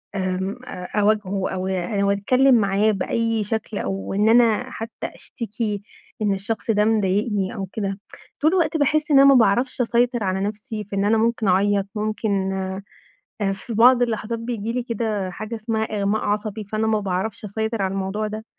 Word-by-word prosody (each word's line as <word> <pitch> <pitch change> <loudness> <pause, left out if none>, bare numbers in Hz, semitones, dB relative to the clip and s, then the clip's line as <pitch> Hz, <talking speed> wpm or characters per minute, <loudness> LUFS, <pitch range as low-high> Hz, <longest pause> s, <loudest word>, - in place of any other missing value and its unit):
آمم 190 +2 -2
أ 180 -5 -7 0.2
أواجهه 200 -2 +1
أو 185 0 -3
أو 200 +2 0
أتكلم 255 +6 +4
معاه 205 0 +3
بأي 225 +2 0
شكل، 220 0 -3
أو 195 0 -3
إن 210 +3 +3
أنا 240 +1 +4
حتى 225 +1 -6
أشتكي 215 -2 -4 0.4
إن 205 -2 +2
الشخص 215 +4 -2
ده 210 -1 +3
مضايقني 205 -1 +1
أو 195 -2 -3
كده، 195 -2 -3 0.4
طول 310 +3 +4
الوقت 330 -4 +2
باحس 300 +1 +1
إن 275 - +7
أنا 275 - +8
ما 275 - +7
باعرفش 245 +3 +3
أسيطر 240 0 +1
على 190 0 0
نفسي 210 +2 -4
في 200 - -7
إن 195 - +1
أنا 220 +2 +3
ممكن 225 -1 +1
اعيط، 200 +1 +2
ممكن 210 -2 -1 0.9
آآ 195 -1 +1
في 200 +4 -7
بعض 245 +3 +6
اللحظات 230 -1 -1
بييجي 230 -2 -3
لي 245 0 -2
كده 215 -5 -2
حاجة 215 +5 -6
اسمها 220 0 -2
إغماء 210 0 -1
عصبي، 210 +1 -2
فأنا 215 +2 -1
ما 220 -1 +2
باعرفش 195 +3 -3
أسيطر 220 +2 -2
على 190 - 0
الموضوع 195 +2 -2
ده. 215 +1 -6
215 Hz, 175 wpm, -22 LUFS, 200-230 Hz, 0.9 s, أنا